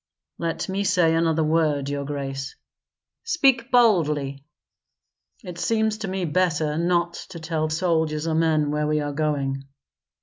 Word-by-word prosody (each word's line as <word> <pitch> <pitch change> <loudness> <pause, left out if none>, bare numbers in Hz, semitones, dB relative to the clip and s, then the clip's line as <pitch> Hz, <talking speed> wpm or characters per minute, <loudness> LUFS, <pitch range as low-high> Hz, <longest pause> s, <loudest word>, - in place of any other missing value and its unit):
Let 165 -1 -2
me 195 +1 -1
say 180 -4 +3
another 165 -1 +2
word, 155 -3 +1
your 140 0 -3
grace." 135 -1 -5 0.7
"Speak 270 - +2
boldly." 150 - +2 1.0
"It 180 -3 -8
seems 220 0 0
to 215 - -4
me 190 -1 -2
better 160 -2 0
not 170 +1 +1 0.2
to 175 -3 -8
tell 160 -1 -2
soldiers 160 -2 0
or 165 - 0
men 155 -2 +2
where 150 0 0
we 150 0 +1
are 145 -1 -3
going." 140 -3 -1
160 Hz, 140 wpm, -24 LUFS, 150-180 Hz, 1.0 s, say